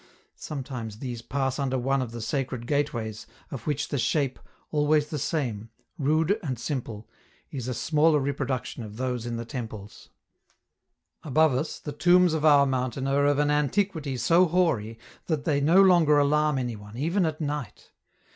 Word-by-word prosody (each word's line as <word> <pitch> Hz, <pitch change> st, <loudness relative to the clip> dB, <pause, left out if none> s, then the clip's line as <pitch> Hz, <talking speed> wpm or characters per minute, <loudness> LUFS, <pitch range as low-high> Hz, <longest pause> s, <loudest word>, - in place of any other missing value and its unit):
Sometimes 125 Hz, -7 st, -6 dB
these 120 Hz, -2 st, -5 dB
pass 135 Hz, +1 st, -2 dB
under 130 Hz, -2 st, 0 dB
one 135 Hz, +2 st, 0 dB
of 125 Hz, -, -3 dB
the 115 Hz, 0 st, -7 dB
sacred 130 Hz, -1 st, -3 dB
gateways, 120 Hz, -6 st, -2 dB, 0.2 s
of 125 Hz, -5 st, -7 dB
which 150 Hz, -1 st, -1 dB
the 140 Hz, -, -1 dB
shape, 140 Hz, +1 st, 0 dB, 0.3 s
always 150 Hz, 0 st, +2 dB
the 150 Hz, -, -2 dB
same, 120 Hz, -8 st, -2 dB, 0.3 s
rude 155 Hz, +8 st, +2 dB
and 135 Hz, -8 st, -3 dB
simple, 120 Hz, -4 st, -5 dB, 0.4 s
is 130 Hz, -4 st, -5 dB
a 125 Hz, -, -2 dB
smaller 155 Hz, +3 st, +3 dB
reproduction 135 Hz, -3 st, -3 dB
of 105 Hz, -1 st, -9 dB
those 125 Hz, -2 st, -2 dB
in 120 Hz, -, -3 dB
the 115 Hz, 0 st, -5 dB
temples. 110 Hz, -5 st, -8 dB, 1.1 s
Above 155 Hz, 0 st, +3 dB
us, 135 Hz, +5 st, -2 dB
the 150 Hz, -, -7 dB
tombs 175 Hz, +3 st, +4 dB
of 160 Hz, -2 st, -1 dB
our 145 Hz, -2 st, +6 dB
mountain 130 Hz, -1 st, -2 dB
are 140 Hz, +1 st, +2 dB
of 145 Hz, -1 st, +2 dB
an 145 Hz, 0 st, +2 dB
antiquity 150 Hz, -1 st, 0 dB
so 170 Hz, +10 st, +4 dB
hoary 155 Hz, -11 st, 0 dB, 0.3 s
that 155 Hz, -4 st, -1 dB
they 145 Hz, -3 st, +1 dB
no 165 Hz, +7 st, +5 dB
longer 175 Hz, -6 st, +5 dB
alarm 150 Hz, 0 st, +2 dB
any 120 Hz, -3 st, -2 dB
one, 105 Hz, +2 st, -11 dB
even 170 Hz, +8 st, +1 dB
at 155 Hz, -2 st, -1 dB
night. 145 Hz, -, -5 dB
140 Hz, 165 wpm, -26 LUFS, 125-150 Hz, 1.1 s, our